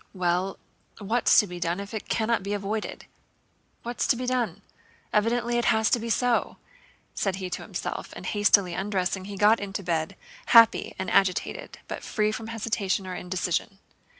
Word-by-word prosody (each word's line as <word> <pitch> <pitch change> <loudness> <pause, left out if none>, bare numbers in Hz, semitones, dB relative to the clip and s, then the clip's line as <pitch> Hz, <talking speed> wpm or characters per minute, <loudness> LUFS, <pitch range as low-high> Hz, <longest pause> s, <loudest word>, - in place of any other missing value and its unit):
"Well, 180 +1 0 0.4
what's 225 +4 +2
to - - +6
be 180 -2 -8
done 175 +2 -1
if 200 +2 -7
it 220 - -6
cannot 230 +1 +1
be 200 +2 -3
avoided? 205 +2 -4 0.8
What's 240 +1 -2
to - - +4
be 250 +1 -4
done? 235 -7 -1 0.5
Evidently 235 +2 +1
it 240 - -1
has 220 -2 +3
to 240 - +3
be 230 +1 -5
so," 245 +1 +1 0.6
said 195 -2 -1
he 185 -1 -5
to - - -3
himself, - - -5
and - - -9
hastily 205 -3 +3
undressing 190 0 -1
he 200 0 -7
got 210 +3 +5
into 200 0 -5
bed, 165 -2 -1 0.3
happy 230 -3 +6
and 190 - -3
agitated 195 - 0
but - - -5
free 215 -1 0
from 225 0 -6
hesitation 215 -3 -1
or 185 - -5
indecision. 180 +1 -2
205 Hz, 170 wpm, -26 LUFS, 190-230 Hz, 0.8 s, to